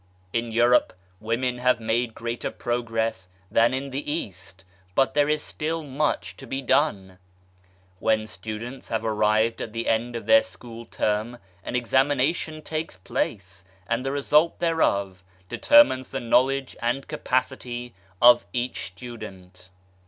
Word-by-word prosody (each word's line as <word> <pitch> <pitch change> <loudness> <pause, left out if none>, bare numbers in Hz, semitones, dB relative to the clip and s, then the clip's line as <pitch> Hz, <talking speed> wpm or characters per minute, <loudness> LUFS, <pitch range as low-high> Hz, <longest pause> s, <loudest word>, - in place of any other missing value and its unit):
In 115 0 -1
Europe 120 +2 +4 0.3
women 125 +3 -1
have 125 0 +3
made 115 +1 -1
greater 115 +1 -3
progress 115 -5 -2 0.2
than 115 +1 +4
in 135 +1 -3
the 140 +2 -3
East, 95 - -6 0.3
but 135 - +3
there 145 0 +3
is 150 0 +1
still 160 +1 -3
much 145 +1 -1
to 135 - -11
be 135 - -3
done! 95 -10 +1 0.8
When 110 -1 +1
students 110 +5 -7
have 110 0 -2
arrived 110 +1 +2
at 110 - -6
the 115 0 -3
end 115 +2 0
of 115 - -5
their 280 0 +7
school 115 - -10
term 110 +2 -1 0.3
an - - -4
examination 140 +5 +1
takes 160 - -4
place, 95 -4 -4 0.2
and 115 +5 -1
the 135 - -1
result 150 +3 +3
thereof 100 - 0 0.2
determines 290 - +5
the 135 - -3
knowledge 130 +3 +2
and 120 +3 -1
capacity 125 -1 -2 0.3
of 120 0 +7
each 125 0 -2
student. 95 -4 -11
120 Hz, 135 wpm, -25 LUFS, 110-135 Hz, 0.8 s, their